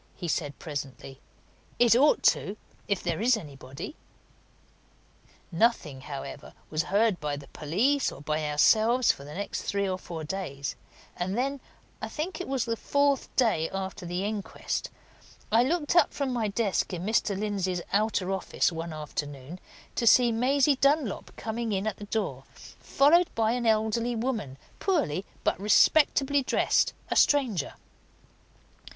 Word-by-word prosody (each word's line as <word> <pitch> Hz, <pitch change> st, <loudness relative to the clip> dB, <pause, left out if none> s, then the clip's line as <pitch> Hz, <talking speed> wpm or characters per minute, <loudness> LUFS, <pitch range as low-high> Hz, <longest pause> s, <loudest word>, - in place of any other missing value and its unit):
he 175 Hz, -, -5 dB
said, 145 Hz, -3 st, -2 dB
presently. 140 Hz, -3 st, -7 dB, 0.6 s
"It 235 Hz, -1 st, +5 dB
ought 285 Hz, +5 st, +4 dB
to! 200 Hz, +2 st, +2 dB, 0.3 s
if 200 Hz, -3 st, -1 dB
there 170 Hz, +1 st, -1 dB
is 240 Hz, +1 st, +4 dB
anybody." 140 Hz, -, -9 dB, 1.6 s
Nothing, 165 Hz, -, +1 dB
however, 140 Hz, +1 st, -8 dB, 0.2 s
was 155 Hz, 0 st, +1 dB
heard 205 Hz, 0 st, +2 dB
by 150 Hz, -1 st, -2 dB
the 140 Hz, -1 st, -10 dB
police 225 Hz, -, +1 dB
or -, -, -10 dB
by 150 Hz, +1 st, -2 dB
ourselves 220 Hz, +11 st, +4 dB
for 140 Hz, -, -10 dB
the 145 Hz, +1 st, -9 dB
next 200 Hz, +2 st, -4 dB
three 200 Hz, 0 st, -1 dB
or 185 Hz, -1 st, -2 dB
four 165 Hz, -3 st, -7 dB
days; 150 Hz, -5 st, -4 dB, 0.4 s
and 185 Hz, +4 st, -2 dB
then 275 Hz, +2 st, -1 dB, 0.4 s
I -, -, -4 dB
think 350 Hz, +4 st, -4 dB
it -, -, -5 dB
was 265 Hz, -3 st, -1 dB
the 230 Hz, -1 st, -1 dB
fourth 280 Hz, +3 st, +1 dB
day 220 Hz, -11 st, +2 dB
after 190 Hz, -2 st, -5 dB
the 180 Hz, +3 st, -2 dB
inquest 210 Hz, -2 st, -3 dB, 0.6 s
I 225 Hz, +2 st, +5 dB
looked 300 Hz, +4 st, 0 dB
up 345 Hz, -4 st, +4 dB
from 275 Hz, -3 st, -1 dB
my 230 Hz, -3 st, 0 dB
desk 205 Hz, -1 st, 0 dB
in 175 Hz, 0 st, -4 dB
Mr. 210 Hz, -2 st, +1 dB
Lindsey's 190 Hz, -4 st, -2 dB
outer 205 Hz, -2 st, +1 dB
office 190 Hz, -2 st, 0 dB
one 165 Hz, 0 st, -5 dB
afternoon 145 Hz, +1 st, -6 dB, 0.3 s
to 235 Hz, -, -1 dB
see 240 Hz, +1 st, +6 dB
Maisie 265 Hz, +4 st, +3 dB
Dunlop 275 Hz, -5 st, +1 dB
coming 225 Hz, 0 st, -3 dB
in 195 Hz, +1 st, -1 dB
at 215 Hz, -3 st, -2 dB
the 205 Hz, -, -8 dB
door, 190 Hz, -, -3 dB, 0.3 s
followed 330 Hz, +6 st, +4 dB
by 225 Hz, -1 st, +2 dB
an 240 Hz, -1 st, -1 dB
elderly 220 Hz, +2 st, +1 dB
woman, 220 Hz, -, -3 dB, 0.2 s
poorly 200 Hz, -, 0 dB, 0.2 s
but -, -, +1 dB
respectably 280 Hz, +6 st, +4 dB
dressed, 255 Hz, -, +2 dB, 0.2 s
a -, -, +1 dB
stranger. 245 Hz, -, +2 dB
210 Hz, 150 wpm, -28 LUFS, 165-245 Hz, 1.6 s, see